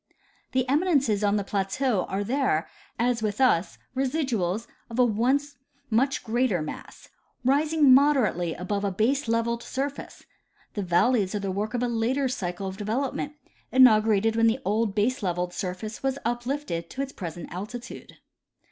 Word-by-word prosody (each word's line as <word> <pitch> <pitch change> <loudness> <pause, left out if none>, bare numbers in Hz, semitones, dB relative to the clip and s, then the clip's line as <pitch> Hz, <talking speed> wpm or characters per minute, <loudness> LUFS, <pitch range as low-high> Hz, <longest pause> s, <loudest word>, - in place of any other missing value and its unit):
The 255 0 +1
eminences 275 - +2
on 205 0 +3
the 205 - 0
plateau 200 +3 0
are 195 +2 -2
there, 235 - 0 0.3
as 240 -1 +1
'with 210 0 -2
us, 185 -10 +2 0.2
residuals 250 - -1 0.2
of 230 - -6
a 250 - +5
once 260 +6 0 0.3
much 265 +5 +1
greater 230 -4 +1
mass, 155 - -8 0.4
rising 290 +1 +4
moderately 255 - +3
above 200 +3 -3
a 200 - +1
base 230 +8 0
levelled 230 +1 0
surface; 275 +3 -5 0.5
the 205 - -2
valleys 195 +3 +2
are - - 0
the 195 -1 -2
work 210 +5 -2
of 245 - 0
a - - +1
later 240 +4 0
cycle 195 -7 -3
of 190 0 -5
development, 255 +7 -2 0.4
inaugurated 220 -4 +5
when 230 0 +4
the 225 +2 +2
old 210 0 0
baselevelled 185 -6 0
surface 190 +5 -5
was 270 0 -1
uplifted 240 - -2
to 270 - -3
its 275 - -6
present 170 -3 -7
altitude. 225 +6 -8
230 Hz, 150 wpm, -26 LUFS, 200-260 Hz, 0.5 s, a